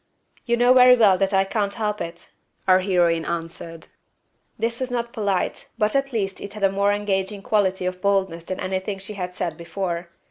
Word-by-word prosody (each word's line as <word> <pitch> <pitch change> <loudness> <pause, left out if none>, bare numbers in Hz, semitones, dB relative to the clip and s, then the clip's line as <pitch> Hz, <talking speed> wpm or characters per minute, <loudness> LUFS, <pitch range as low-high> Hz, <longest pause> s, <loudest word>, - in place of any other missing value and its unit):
"You 235 0 +2
know 245 +1 +5
very 250 0 +8
well 205 -6 +5
that 195 -1 +1
I 195 -1 +4
can't 200 0 -2
help 210 -2 -2
it," 170 0 -7 0.4
our 185 0 +6
heroine 175 -3 +2
answered. 165 -1 -6 0.7
This 230 +1 -1
was 260 -1 -2
not 235 -1 -3
polite, 200 -4 -1
but 215 0 +1
at 275 0 +1
least 195 -5 -2
it 200 - -7
had 210 -2 -7
a 195 - +4
more 200 +1 +2
engaging 200 -1 -1
quality 190 -4 +1
of 185 0 -3
boldness 190 -4 0
than 185 - -4
anything 190 +1 -3
she 195 +3 -7
had 180 -2 -5
said 170 -4 -3
before. 170 0 -4
195 Hz, 190 wpm, -23 LUFS, 180-210 Hz, 0.7 s, very